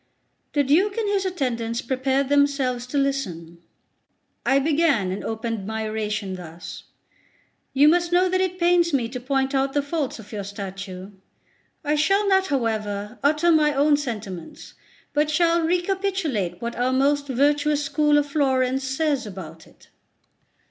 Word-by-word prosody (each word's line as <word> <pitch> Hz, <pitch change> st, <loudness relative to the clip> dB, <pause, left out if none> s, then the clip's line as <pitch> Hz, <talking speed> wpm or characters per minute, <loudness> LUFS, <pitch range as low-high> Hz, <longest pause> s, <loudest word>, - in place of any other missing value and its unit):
The 290 Hz, -, +3 dB
Duke 370 Hz, -, +2 dB
and 445 Hz, -2 st, 0 dB
his 400 Hz, -1 st, 0 dB
attendants 235 Hz, -9 st, -2 dB
prepared 265 Hz, +2 st, 0 dB
themselves 280 Hz, -3 st, +1 dB
to 285 Hz, -, -3 dB
listen. 180 Hz, -13 st, -2 dB, 0.8 s
I 270 Hz, -, +3 dB
began 285 Hz, -, +2 dB
and 190 Hz, -, -4 dB
opened 225 Hz, -2 st, -4 dB
by 220 Hz, 0 st, -3 dB
oration 210 Hz, -3 st, -3 dB
thus: 170 Hz, -1 st, -9 dB, 0.9 s
"You 285 Hz, +2 st, +6 dB
must 345 Hz, +2 st, +3 dB
know 360 Hz, +1 st, +4 dB
that 370 Hz, +1 st, +1 dB
it 370 Hz, -1 st, -1 dB
pains 345 Hz, -2 st, +3 dB
me 250 Hz, -4 st, +1 dB
to 250 Hz, +1 st, -5 dB
point 270 Hz, +2 st, -1 dB
out 270 Hz, 0 st, +1 dB
the 290 Hz, -, +1 dB
faults 285 Hz, -2 st, -2 dB
of 220 Hz, -3 st, -13 dB
your 205 Hz, -2 st, -4 dB
statue; 195 Hz, -1 st, -7 dB, 0.7 s
I 300 Hz, 0 st, 0 dB
shall 390 Hz, +7 st, +2 dB
not, 385 Hz, -1 st, +3 dB
however, 215 Hz, -, -2 dB
utter 305 Hz, +4 st, +3 dB
my 300 Hz, -2 st, +3 dB
own 290 Hz, +2 st, +4 dB
sentiments, 210 Hz, -, -6 dB, 0.4 s
but 300 Hz, +1 st, +2 dB
shall 335 Hz, +2 st, +3 dB
recapitulate 355 Hz, -, -1 dB
what 235 Hz, 0 st, -3 dB
our 250 Hz, +1 st, +1 dB
most 285 Hz, +2 st, +2 dB
virtuous 290 Hz, +3 st, +2 dB
school 295 Hz, 0 st, +2 dB
of 290 Hz, -, +2 dB
Florence 265 Hz, -2 st, +1 dB
says 270 Hz, -1 st, -1 dB
about 165 Hz, -5 st, -9 dB
it." -, -, -22 dB
275 Hz, 150 wpm, -23 LUFS, 220-305 Hz, 0.9 s, You